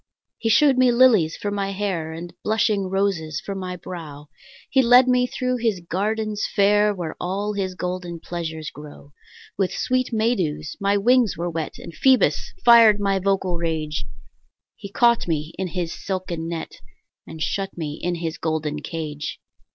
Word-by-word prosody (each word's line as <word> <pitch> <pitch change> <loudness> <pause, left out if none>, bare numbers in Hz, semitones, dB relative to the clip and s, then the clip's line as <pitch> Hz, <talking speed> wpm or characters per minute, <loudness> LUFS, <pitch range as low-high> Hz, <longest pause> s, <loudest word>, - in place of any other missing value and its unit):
He 225 - 0
shew'd 265 +3 +5
me 255 -1 +5
lilies 235 -10 +4
for 205 - -3
my 195 -1 -2
hair, 185 -5 -2
And 170 +1 -8
blushing 210 -3 +1
roses 190 -6 -1
for 200 - -6
my 185 -1 -5
brow; 155 -5 -9 0.4
He 265 - +3
led 250 +1 +6
me 250 0 +3
thro' 255 0 -2
his 225 -5 0
gardens 210 +4 -2
fair 205 +1 +4
Where 175 -6 -5
all 200 +4 -2
his 190 -2 -3
golden 180 -2 -4
pleasures 160 -2 -5
grow. 145 -1 -13 0.5
With 190 -2 +1
sweet 255 0 -1
May 225 +1 +2
dews 155 -5 -3
my 200 0 +2
wings 240 +1 +3
were 175 +1 -2
wet, 160 -2 -4
And 170 - -10
Phoebus 260 +6 +3
fired 230 -3 +8
my 195 -1 +1
vocal 190 -2 0
rage; 155 -4 -2 0.7
He 200 - -9
caught 235 -1 +3
me 155 -1 -2
in 190 - -1
his 175 -2 -3
silken 180 -4 -4
net, 165 -1 -6 0.5
And 160 - -9
shut 195 +5 -2
me 150 -3 -4
in 175 0 -1
his 165 -1 -4
golden 155 -2 -2
cage. 150 -2 -5
185 Hz, 165 wpm, -23 LUFS, 165-210 Hz, 0.7 s, fired